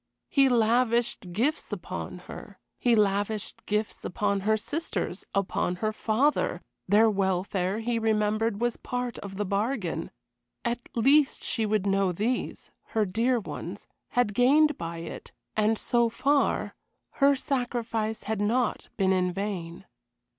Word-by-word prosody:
He 275 Hz, -2 st, +4 dB
lavished 235 Hz, -3 st, +2 dB
gifts 250 Hz, -, 0 dB
upon -, -, -5 dB
her; -, -, -10 dB, 0.2 s
he 240 Hz, -2 st, +4 dB
lavished 205 Hz, 0 st, 0 dB
gifts 210 Hz, +1 st, -1 dB
upon 200 Hz, +2 st, 0 dB
her 215 Hz, +3 st, +2 dB
sisters, 230 Hz, -, -3 dB
upon 185 Hz, -2 st, 0 dB
her 215 Hz, +4 st, -1 dB
father; 240 Hz, +8 st, +1 dB, 0.3 s
their 210 Hz, +4 st, +5 dB
welfare, 190 Hz, 0 st, 0 dB
he 235 Hz, 0 st, 0 dB
remembered, 215 Hz, -1 st, +1 dB
was 240 Hz, 0 st, 0 dB
part 245 Hz, 0 st, -4 dB
of 195 Hz, -1 st, -8 dB
the 205 Hz, -, -1 dB
bargain. 200 Hz, -1 st, -1 dB, 0.6 s
At 235 Hz, 0 st, 0 dB, 0.2 s
least 275 Hz, +5 st, +4 dB
she 225 Hz, -2 st, 0 dB
would 210 Hz, -2 st, +1 dB
know 195 Hz, -1 st, +2 dB
these 220 Hz, +8 st, -2 dB, 0.3 s
her 215 Hz, -, +4 dB
dear 230 Hz, +6 st, +1 dB
ones 210 Hz, -, -7 dB, 0.2 s
had 245 Hz, -4 st, +1 dB
gained 290 Hz, +6 st, +5 dB
by 170 Hz, -4 st, -5 dB
it, 165 Hz, -, -8 dB, 0.2 s
and, 215 Hz, +1 st, +2 dB
so 235 Hz, +1 st, +2 dB
far, 275 Hz, +5 st, +1 dB, 0.5 s
her 280 Hz, 0 st, +6 dB
sacrifice 235 Hz, -5 st, -2 dB
had 220 Hz, -1 st, -2 dB
not 230 Hz, +3 st, 0 dB
been 190 Hz, -2 st, +3 dB
in 180 Hz, -1 st, +1 dB
vain. 180 Hz, -3 st, -4 dB
220 Hz, 135 wpm, -27 LUFS, 200-245 Hz, 0.6 s, her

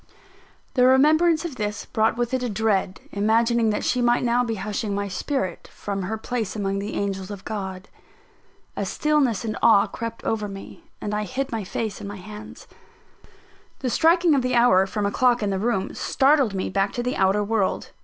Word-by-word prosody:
The 250 Hz, -1 st, +4 dB
remembrance 315 Hz, +5 st, +4 dB
of 295 Hz, -7 st, -5 dB
this 210 Hz, -1 st, -3 dB
brought 220 Hz, +1 st, +1 dB
with 240 Hz, +1 st, -1 dB
it 260 Hz, -, +1 dB
a 250 Hz, -, -2 dB
dread 205 Hz, -3 st, 0 dB
imagining 225 Hz, +2 st, +2 dB
that 210 Hz, -, -1 dB
she 250 Hz, -, +1 dB
might 240 Hz, 0 st, +2 dB
now 245 Hz, 0 st, +2 dB
be 230 Hz, -2 st, -2 dB
hushing 205 Hz, +1 st, -3 dB
my 200 Hz, 0 st, -2 dB
spirit, 190 Hz, -, -3 dB
from 200 Hz, -1 st, -4 dB
her 205 Hz, +4 st, -3 dB
place 220 Hz, -2 st, -3 dB
among 195 Hz, -2 st, -1 dB
the 205 Hz, +2 st, -5 dB
angels 195 Hz, -1 st, -3 dB
of 200 Hz, -2 st, -8 dB
God. 190 Hz, -2 st, -5 dB, 0.9 s
A -, -, -2 dB
stillness 280 Hz, -8 st, +1 dB
and 220 Hz, -, -2 dB
awe 220 Hz, -3 st, +6 dB
crept 230 Hz, 0 st, -6 dB
over 215 Hz, -2 st, -1 dB
me; 200 Hz, -, -11 dB
and 210 Hz, -, -4 dB
I 210 Hz, 0 st, -1 dB
hid 270 Hz, +4 st, -3 dB
my 225 Hz, -3 st, -2 dB
face 215 Hz, +2 st, -4 dB
in -, -, -6 dB
my 205 Hz, 0 st, -7 dB
hands. 210 Hz, +3 st, -10 dB, 1.2 s
The 255 Hz, -, -1 dB
striking 335 Hz, +2 st, +4 dB
of 275 Hz, -, +3 dB
the 255 Hz, 0 st, 0 dB
hour 195 Hz, -6 st, +5 dB
from 205 Hz, +1 st, -2 dB
a 200 Hz, -, 0 dB
clock 245 Hz, 0 st, +2 dB
in 200 Hz, -, 0 dB
the 190 Hz, -, -1 dB
room, 205 Hz, -3 st, -1 dB
startled 270 Hz, -6 st, +2 dB
me 185 Hz, -, -2 dB
back 195 Hz, +1 st, 0 dB
to 240 Hz, -, -2 dB
the 250 Hz, +1 st, -1 dB
outer 195 Hz, +2 st, +2 dB
world. 205 Hz, -2 st, -1 dB
220 Hz, 195 wpm, -24 LUFS, 200-250 Hz, 1.2 s, awe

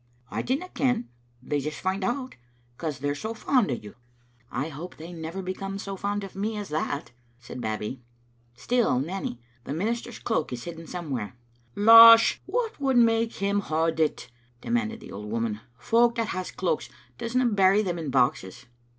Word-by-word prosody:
" 125 Hz, 0 st, -33 dB
I -, -, -1 dB
dinna 275 Hz, +9 st, -2 dB
ken. 245 Hz, -6 st, 0 dB, 0.3 s
They 145 Hz, +2 st, -1 dB
just 150 Hz, +2 st, -4 dB
find 190 Hz, +1 st, -1 dB
out, 255 Hz, +5 st, -2 dB, 0.4 s
because 155 Hz, 0 st, -4 dB
they're 145 Hz, +1 st, -1 dB
so 220 Hz, +10 st, -5 dB
fond 245 Hz, -2 st, +2 dB
o' 125 Hz, -, 0 dB
you." 105 Hz, -3 st, -10 dB, 0.3 s
" 120 Hz, 0 st, -35 dB
I 140 Hz, +5 st, -2 dB
hope 160 Hz, +5 st, -8 dB
they 165 Hz, +3 st, -9 dB
will 165 Hz, -, -9 dB
never 165 Hz, +4 st, -5 dB
become 195 Hz, +1 st, -4 dB
so 195 Hz, 0 st, -5 dB
fond 205 Hz, +1 st, -2 dB
of 195 Hz, -, -9 dB
me 210 Hz, +2 st, -2 dB
as 205 Hz, -1 st, -5 dB
that," 145 Hz, -4 st, -3 dB, 0.3 s
said 125 Hz, 0 st, -8 dB
Babbie. 110 Hz, +3 st, -3 dB, 0.3 s
" 120 Hz, 0 st, -37 dB
Still, 240 Hz, -, +1 dB
Nanny, 160 Hz, -4 st, -4 dB, 0.2 s
the 140 Hz, -, -5 dB
minister's 225 Hz, +7 st, -2 dB
cloak 220 Hz, -, -1 dB
is 125 Hz, -1 st, -5 dB
hidden 165 Hz, -1 st, -8 dB
somewhere. 135 Hz, -, -4 dB, 0.2 s
" 120 Hz, 0 st, -36 dB
" -, -, -35 dB
Losh, 230 Hz, +2 st, +9 dB
what 465 Hz, -6 st, -2 dB
would 270 Hz, -2 st, +2 dB
make 230 Hz, -1 st, +3 dB
him 200 Hz, +1 st, 0 dB
hod 160 Hz, -3 st, 0 dB
it?" 150 Hz, -5 st, 0 dB, 0.3 s
demanded 230 Hz, -, -2 dB
the -, -, -11 dB
old 105 Hz, +1 st, -7 dB
woman. 115 Hz, -1 st, -2 dB
" -, -, -37 dB
Folk 235 Hz, -, +3 dB
that 230 Hz, -2 st, -1 dB
has 185 Hz, 0 st, -3 dB
cloaks 165 Hz, -8 st, -2 dB, 0.3 s
doesna 250 Hz, +2 st, 0 dB
bury 195 Hz, +2 st, +5 dB
them 175 Hz, -3 st, -2 dB
in 155 Hz, -3 st, -4 dB
boxes." 125 Hz, -4 st, 0 dB
180 Hz, 195 wpm, -26 LUFS, -, 0.4 s, Losh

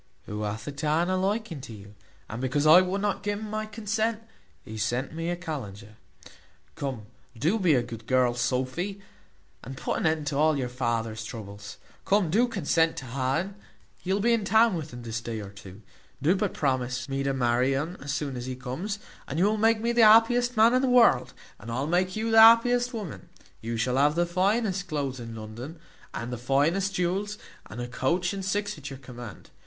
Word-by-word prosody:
who 105 Hz, +1 st, -5 dB
hath 105 Hz, +1 st, -4 dB
a -, -, -2 dB
taan 155 Hz, +5 st, 0 dB
a -, -, +1 dB
liking 190 Hz, -4 st, -2 dB
to 120 Hz, -, -9 dB
you, 100 Hz, -1 st, -12 dB, 0.3 s
and 115 Hz, +3 st, -6 dB
because 130 Hz, +3 st, 0 dB
I 160 Hz, +4 st, +9 dB
would 185 Hz, +2 st, -2 dB
not 205 Hz, 0 st, -1 dB
gi 205 Hz, 0 st, -1 dB
un 215 Hz, +1 st, -5 dB
my 215 Hz, 0 st, -3 dB
consent, 220 Hz, +1 st, -2 dB, 0.4 s
he 110 Hz, -, -8 dB
sent 120 Hz, +7 st, -2 dB
me 165 Hz, +1 st, -3 dB
a 175 Hz, -, 0 dB
kallenge. 135 Hz, -, -6 dB, 0.9 s
Come, 130 Hz, -, -5 dB, 0.3 s
do 170 Hz, -, +1 dB
be 175 Hz, -6 st, +4 dB
a 125 Hz, -, +2 dB
good 115 Hz, -2 st, -9 dB
girl, 130 Hz, -2 st, +3 dB
Sophy, 130 Hz, +11 st, -2 dB, 0.6 s
and 130 Hz, +2 st, -8 dB
put -, -, -2 dB
an -, -, +1 dB
end 160 Hz, -1 st, 0 dB
to 140 Hz, -1 st, -2 dB
all 155 Hz, 0 st, +3 dB
your 125 Hz, -2 st, -2 dB
father's 115 Hz, -3 st, -2 dB
troubles; 105 Hz, -3 st, -8 dB, 0.3 s
come, 195 Hz, -5 st, +2 dB
do 235 Hz, +7 st, +3 dB
consent 165 Hz, -6 st, +1 dB
to 135 Hz, -, -6 dB
ha 130 Hz, +1 st, -1 dB
un; 190 Hz, +7 st, -2 dB, 0.4 s
he 185 Hz, -, -4 dB
will 195 Hz, -, +2 dB
be 235 Hz, +3 st, +3 dB
in 230 Hz, -2 st, +1 dB
town 220 Hz, +2 st, +4 dB
within 150 Hz, -8 st, -6 dB
this 115 Hz, 0 st, -4 dB
day 115 Hz, -1 st, -5 dB
or 100 Hz, -2 st, -8 dB
two; 100 Hz, +1 st, -13 dB, 0.4 s
do 155 Hz, +7 st, +3 dB
but 200 Hz, 0 st, -1 dB
promise 130 Hz, -3 st, -1 dB
me 135 Hz, 0 st, -2 dB
to 140 Hz, 0 st, 0 dB
marry 125 Hz, +1 st, +1 dB
un 155 Hz, +6 st, -3 dB
as 140 Hz, +1 st, -4 dB
soon 140 Hz, -2 st, -3 dB
as 125 Hz, 0 st, -5 dB
he 130 Hz, -, -4 dB
comes, 135 Hz, +12 st, -4 dB, 0.3 s
and 140 Hz, -, -4 dB
you 180 Hz, -, +3 dB
will 210 Hz, +1 st, +2 dB
make 225 Hz, +1 st, +3 dB
me 235 Hz, +1 st, +1 dB
the 235 Hz, 0 st, +3 dB
happiest 230 Hz, +2 st, +5 dB
man 225 Hz, +2 st, +6 dB
in 255 Hz, -, +3 dB
the 265 Hz, -, +1 dB
world, 230 Hz, -, +4 dB, 0.3 s
and 115 Hz, -, -8 dB
I 120 Hz, -, -2 dB
will 135 Hz, -, -1 dB
make 180 Hz, +3 st, +1 dB
you 225 Hz, +1 st, -1 dB
the 225 Hz, 0 st, +8 dB
happiest 245 Hz, +2 st, +6 dB
woman; 210 Hz, -, -7 dB, 0.3 s
you 115 Hz, +1 st, -3 dB
shall 125 Hz, +3 st, 0 dB
have 145 Hz, +2 st, +3 dB
the 175 Hz, +1 st, +2 dB
finest 195 Hz, +2 st, 0 dB
cloaths 140 Hz, -5 st, -3 dB
in 115 Hz, -1 st, -7 dB
London, 115 Hz, +9 st, -8 dB, 0.3 s
and 120 Hz, +1 st, -5 dB
the 120 Hz, -, -5 dB
finest 160 Hz, +10 st, +1 dB
jewels, 195 Hz, +4 st, -1 dB, 0.3 s
and 120 Hz, -, -9 dB
a 120 Hz, -, -3 dB
coach 170 Hz, +10 st, 0 dB
and 195 Hz, -1 st, -5 dB
six 200 Hz, -1 st, -2 dB
at 145 Hz, -1 st, -7 dB
your 135 Hz, -, -8 dB
command. 120 Hz, -4 st, -11 dB
150 Hz, 210 wpm, -27 LUFS, 125-200 Hz, 0.9 s, I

